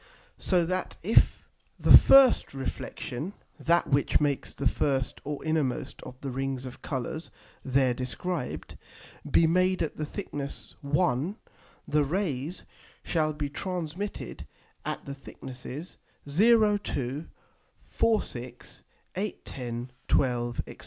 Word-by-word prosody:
so 180 -3 +2
that 185 +2 -2
if 220 +6 +3 0.3
the - - +9
first 270 - +7
Reflexion 135 +4 -4 0.3
(that 170 +1 +3
which 140 0 +3
makes 145 -2 0
the 140 - +1
first 135 0 0
or 145 0 -5
innermost 155 -5 -1
of 130 0 -10
the 135 - -4
Rings 135 0 -2
of 125 - -9
Colours 145 +4 -4 0.3
there 130 -1 +3
described) 125 - -4 0.5
be 165 - +5
made 185 +2 +3
at 160 - -4
the 155 - -2
thickness 145 -7 -6
1, 150 +3 +1 0.5
the 150 0 +3
Rays 160 -1 -2 0.4
shall 155 -2 +1
be 150 -1 -3
transmitted 180 +4 -4 0.4
at - - -4
the 140 - -5
thicknesses 135 +3 -9 0.3
0, 210 +6 +5
2, 140 -4 -3 0.6
4, 225 -2 +2
6, 120 0 -9 0.3
8, 200 +3 -3
10, 120 -1 -5 0.2
12, 120 -2 +1
&c. - - -10
145 Hz, 120 wpm, -28 LUFS, 130-180 Hz, 0.6 s, the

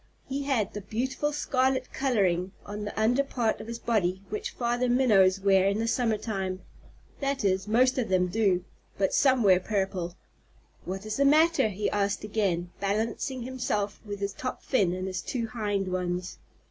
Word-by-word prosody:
He 275 +1 -3
had 235 -8 0
the 210 - -5
beautiful 260 +8 -2
scarlet 260 -3 0
coloring 195 -8 +1
on 210 +1 -5
the 205 - -5
under 245 +5 +3
part 240 -5 -1
of - - -9
his 235 0 -5
body 195 -5 0
which 210 - -3
Father 245 +1 -1
Minnows 205 -7 +4
wear 195 -1 +4
in 200 +1 +1
the 225 +1 -1
summer 230 -2 +1
time. 190 -4 -3 0.6
That 275 -4 -1
is, 190 +1 +1
most 255 +4 +3
of 230 - -1
them 185 -1 +3
do, 185 -2 +1 0.3
but 195 -1 +1
some 260 -3 +4
wear 185 -3 +6
purple. 190 -3 -2 0.7
"What 190 +3 -5
is 215 0 -3
the 280 - +3
matter?" 315 -1 +5
he 205 0 -2
asked 200 0 0
again, 190 -5 -1
balancing 225 +5 -1
himself 235 -5 -2
with 205 -2 -6
his 200 0 -2
top 255 +4 -5
fin 200 -10 +2
and 185 0 -3
his 185 -1 -3
two 245 -4 -3
hind 205 -4 -1
ones. 180 0 -3
210 Hz, 175 wpm, -28 LUFS, 190-250 Hz, 0.7 s, wear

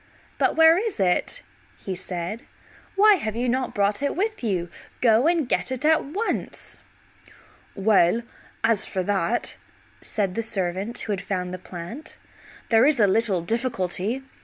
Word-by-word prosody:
"But - - +2
where 325 +2 +6
is 435 - -3
it?" 190 - +1 0.4
said 185 +1 -4
he. - - -23 0.5
"Why 415 0 +6
have 215 -8 -3
you 245 +2 -1
not 255 0 -1
brought 205 +3 +1
it 285 - -1
with 420 - -2
you? 180 -6 -1 0.3
Go 235 +3 +4
and 335 -5 +2
get 260 - 0
it 260 +3 -3
at 315 0 +4
once." 390 +11 -4 1.0
"Well, 200 +1 +3 0.4
as 225 -3 +2
for 185 - -2
that," 200 +4 0 0.4
said 195 -4 -2
the 230 - -1
servant 195 +1 -2
who 215 - -4
had 195 -3 -2
found 180 -2 -3
the 185 - -5
plant, 180 - -9 0.5
"there 225 +3 +5
is 300 -4 +2
a 210 - +6
little 200 -2 +2
difficulty. 225 +2 -2
225 Hz, 155 wpm, -24 LUFS, 190-265 Hz, 1.0 s, where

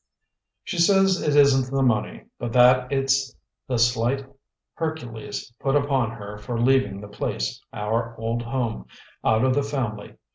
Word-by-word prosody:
"She 175 - -4
says 195 +1 +4
it 150 -1 +1
isn't 135 -3 +5
the 135 0 +1
money, 120 -4 0 0.2
but 120 -1 -4
that 125 +1 +5
it's 135 -1 +1 0.3
the 125 - -1
slight 120 +3 +1 0.5
Hercules 120 -9 -5
put 135 +1 0
upon 140 -5 +1
her 105 -2 -8
for 115 +2 -4
leaving 120 -5 +2
the 105 - -9
place, 65 -11 -3
our 115 +2 -2
old 115 +1 -2
home, 115 -1 -3 0.4
out 110 +2 +3
of 130 - +3
the 145 - +2
family. 125 -7 -4
125 Hz, 150 wpm, -24 LUFS, 115-135 Hz, 0.5 s, isn't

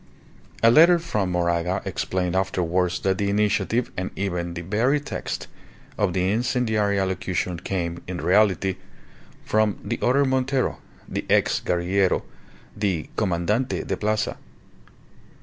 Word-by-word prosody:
A 115 - +7
letter 170 +6 +7
from 110 - -2
Moraga 85 +1 0
explained 90 -1 -2
afterwards 90 -1 0
that 95 -1 0
the 100 -1 +1
initiative, 105 +4 +1
and 90 +1 -3
even 90 -3 -3
the 85 - -5
very 115 - +1
text, 145 - -5 0.5
of 100 -4 0
the 95 +1 +1
incendiary 110 -3 +1
allocution 90 -2 -2
came, 85 -2 -3
in 90 -1 -4
reality, 95 0 +2 0.7
from 110 -1 +1
the 115 +4 -3
other 140 +3 +3
Montero, 130 0 0 0.3
the - - -3
ex - - +3
guerillero, 90 +2 +1 0.5
the 95 -6 -2
Commandante 105 +5 0
de - - -2
Plaza. 110 0 -1
95 Hz, 125 wpm, -24 LUFS, 90-110 Hz, 0.7 s, A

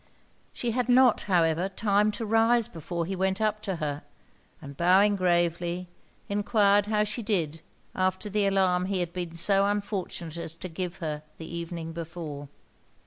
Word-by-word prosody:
She 240 - -2
had 250 +1 -1
not, 250 -1 +5
however, 170 0 +2
time 205 +1 +2
to 225 - -4
rise 225 +1 +3
before 170 +1 -4
he 190 +3 -3
went 190 +1 0
up 215 -1 0
to 195 -3 -3
her, 150 -2 -3 0.6
and 140 -4 -10
bowing 190 +6 +4
gravely, 175 -1 0 0.4
enquired 205 0 +3
how 210 -1 +2
she 215 +3 -3
did 165 -8 -1 0.3
after 185 +2 0
the 205 0 +1
alarm 185 -2 +2
he 190 0 -1
had 175 -1 -3
been 175 -2 -4
so 195 +3 +3
unfortunate 200 -5 -3
as 165 -1 -5
to 180 +2 -7
give 175 +2 -4
her 150 -1 -3 0.2
the 160 - -8
evening 170 -1 -5
before? 160 -4 -7
185 Hz, 160 wpm, -27 LUFS, 170-205 Hz, 0.6 s, not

